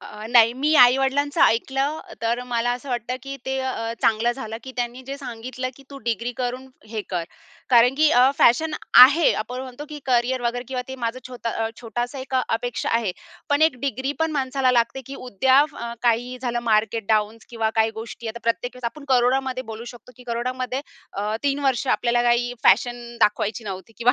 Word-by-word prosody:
अ, 210 Hz, +1 st, -9 dB
नाही 235 Hz, -1 st, +6 dB
मी 295 Hz, +4 st, +1 dB
आई-वडिलांचं 270 Hz, +4 st, +4 dB
ऐकलं, 270 Hz, +6 st, +1 dB, 0.2 s
तर 235 Hz, +2 st, 0 dB
मला 240 Hz, 0 st, 0 dB
असं 275 Hz, -, -13 dB
वाटतं 245 Hz, 0 st, -2 dB
की 275 Hz, 0 st, -6 dB
ते 265 Hz, 0 st, -1 dB
अ, 230 Hz, -3 st, -3 dB
चांगलं 230 Hz, +2 st, +2 dB
झालं, 225 Hz, -4 st, -6 dB
की 260 Hz, -, -8 dB
त्यांनी 245 Hz, +1 st, -3 dB
जे 275 Hz, -, -5 dB
सांगितलं 255 Hz, 0 st, -5 dB
की 275 Hz, -, -15 dB
तू 275 Hz, -, -9 dB
डिग्री 235 Hz, +2 st, -1 dB
करून 255 Hz, +1 st, -3 dB, 0.2 s
हे 215 Hz, -1 st, -4 dB
कर. 175 Hz, -2 st, -1 dB, 0.5 s
कारण 245 Hz, +2 st, +6 dB
की 310 Hz, 0 st, +5 dB
अ, 250 Hz, +2 st, +5 dB
फॅशन 310 Hz, +7 st, +4 dB, 0.3 s
आहे 290 Hz, +5 st, +6 dB
आपण 250 Hz, +4 st, -7 dB
म्हणतो 260 Hz, +2 st, -8 dB
की 300 Hz, -1 st, -7 dB
करियर 250 Hz, +1 st, +1 dB
वगैरे 245 Hz, +1 st, -2 dB
किंवा 255 Hz, -1 st, -3 dB
ते 265 Hz, -, -5 dB
माझं 230 Hz, +2 st, -2 dB
छोट 245 Hz, -2 st, -9 dB, 0.3 s
छोटासा 240 Hz, +3 st, -4 dB
एक 260 Hz, 0 st, -6 dB
अपेक्षा 245 Hz, -1 st, -1 dB
आहे. 205 Hz, -6 st, -2 dB, 0.4 s
पण 285 Hz, +2 st, +2 dB
एक 315 Hz, -5 st, +4 dB
डिग्री 270 Hz, 0 st, -2 dB
पण 320 Hz, 0 st, +1 dB
माणसाला 265 Hz, -2 st, +1 dB
लागते 235 Hz, +2 st, +1 dB
की 275 Hz, -, -7 dB
उद्या 260 Hz, +4 st, +3 dB
फ -, -, -21 dB, 0.3 s
काही 245 Hz, +1 st, +1 dB
झालं, 240 Hz, -2 st, -2 dB
मार्केट 220 Hz, -1 st, +1 dB
डाऊन 215 Hz, 0 st, +1 dB
किंवा 225 Hz, -2 st, -1 dB
काही 220 Hz, 0 st, +3 dB
गोष्टी. 225 Hz, +1 st, -7 dB
आता 235 Hz, +2 st, -6 dB
प्रत्येक 230 Hz, +2 st, -1 dB
वेळेस 250 Hz, -, -12 dB
आपण 285 Hz, +5 st, -4 dB
कोरोनामध्ये 255 Hz, +1 st, +2 dB
बोलू 220 Hz, +2 st, -7 dB
शकतो 240 Hz, +2 st, -15 dB
की 250 Hz, -, -15 dB
कोरोनामध्ये 255 Hz, +2 st, -3 dB, 0.3 s
अ, 210 Hz, +2 st, -2 dB
3 280 Hz, 0 st, +1 dB
वर्ष 265 Hz, 0 st, +1 dB
आपल्याला 240 Hz, 0 st, +1 dB
काही 240 Hz, 0 st, +2 dB
फॅशन 240 Hz, +3 st, +2 dB
दाखवायची 210 Hz, +1 st, +1 dB
नव्हती 195 Hz, +2 st, -7 dB
किंवा 245 Hz, +2 st, +4 dB
245 Hz, 190 wpm, -23 LUFS, 230-265 Hz, 0.5 s, नाही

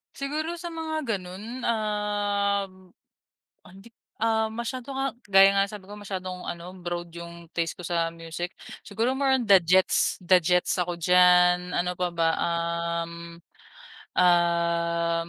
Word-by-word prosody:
Siguro 305 Hz, +4 st, -3 dB
sa 345 Hz, -, -5 dB
mga 320 Hz, -1 st, -4 dB, 0.2 s
ganun, 205 Hz, +8 st, -8 dB
um, 205 Hz, -2 st, 0 dB, 0.9 s
hindi, 195 Hz, +5 st, -15 dB, 0.3 s
ah, 220 Hz, -1 st, +2 dB
masyado 245 Hz, +3 st, -5 dB
nga 270 Hz, 0 st, -1 dB, 0.2 s
gaya 195 Hz, 0 st, +7 dB
nga 195 Hz, -, +4 dB
sabi 205 Hz, -2 st, -9 dB
ko 205 Hz, -, -8 dB
masyadong 185 Hz, -3 st, -6 dB
ano, 170 Hz, +1 st, -6 dB
broad 175 Hz, 0 st, -4 dB
'yung 170 Hz, -1 st, -10 dB
taste 165 Hz, -1 st, -1 dB
ko -, -, -9 dB
sa 165 Hz, -1 st, 0 dB
music. 165 Hz, +2 st, -6 dB, 0.3 s
Siguro 225 Hz, +5 st, -1 dB
more 270 Hz, -1 st, +3 dB
on 235 Hz, -, -4 dB
The 195 Hz, -, +9 dB
Jets, 185 Hz, +3 st, +2 dB
The 180 Hz, +1 st, +5 dB
Jets 180 Hz, +3 st, +2 dB
ako 175 Hz, -1 st, -3 dB
diyan, 180 Hz, 0 st, +5 dB
ano 180 Hz, +1 st, 0 dB
pa 180 Hz, -, 0 dB
ba, 165 Hz, -1 st, +1 dB
um, 170 Hz, 0 st, -2 dB, 1.0 s
um, 170 Hz, -1 st, +2 dB
180 Hz, 135 wpm, -26 LUFS, 170-210 Hz, 1.0 s, The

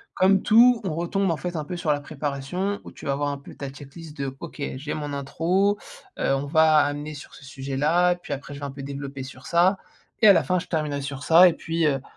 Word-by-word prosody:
comme 190 Hz, +1 st, +4 dB
tout, 235 Hz, +2 st, +6 dB
on 175 Hz, -5 st, -2 dB
retombe, 175 Hz, +3 st, 0 dB
en 160 Hz, -, -1 dB
fait, 175 Hz, +1 st, -5 dB
un 155 Hz, -, -2 dB
peu, 175 Hz, +4 st, -6 dB
sur 160 Hz, -4 st, +1 dB
la 145 Hz, -, -3 dB
préparation 150 Hz, +7 st, -3 dB
où -, -, -10 dB
tu -, -, -13 dB
vas 140 Hz, -, 0 dB
voir 145 Hz, +1 st, -1 dB
un 140 Hz, -, -3 dB
peu 140 Hz, -, -13 dB
ta 140 Hz, -1 st, -6 dB
check 140 Hz, 0 st, -13 dB
list 160 Hz, -2 st, -10 dB
de: 135 Hz, -1 st, -4 dB
«OK, 155 Hz, -3 st, -8 dB
j'ai 145 Hz, +3 st, -5 dB
mon 145 Hz, -1 st, -4 dB
intro, 175 Hz, +9 st, 0 dB, 0.4 s
heu, -, -, +1 dB
on 140 Hz, +1 st, -3 dB
va 160 Hz, 0 st, +5 dB
amener 145 Hz, +1 st, -1 dB
sur 145 Hz, -, -11 dB
ce 135 Hz, -, -13 dB
sujet-là. 145 Hz, +6 st, +1 dB
Puis 175 Hz, -4 st, -7 dB
après, 140 Hz, +1 st, -7 dB
je -, -, -9 dB
vais 145 Hz, -, -5 dB
un 140 Hz, -, -5 dB
peu 135 Hz, 0 st, -9 dB
développer 140 Hz, -1 st, -6 dB
sur 130 Hz, 0 st, -11 dB
ça 180 Hz, +3 st, +3 dB, 0.4 s
et 215 Hz, -, +7 dB
à 200 Hz, -, +10 dB
la -, -, +3 dB
fin, 180 Hz, -1 st, +1 dB
je -, -, -8 dB
terminerai 150 Hz, -3 st, -2 dB
sur 140 Hz, 0 st, -6 dB
ça». 175 Hz, +3 st, +7 dB
Et 170 Hz, -, +3 dB
puis 165 Hz, 0 st, -2 dB
heu, 135 Hz, -2 st, 0 dB
150 Hz, 255 wpm, -24 LUFS, 140-175 Hz, 0.4 s, à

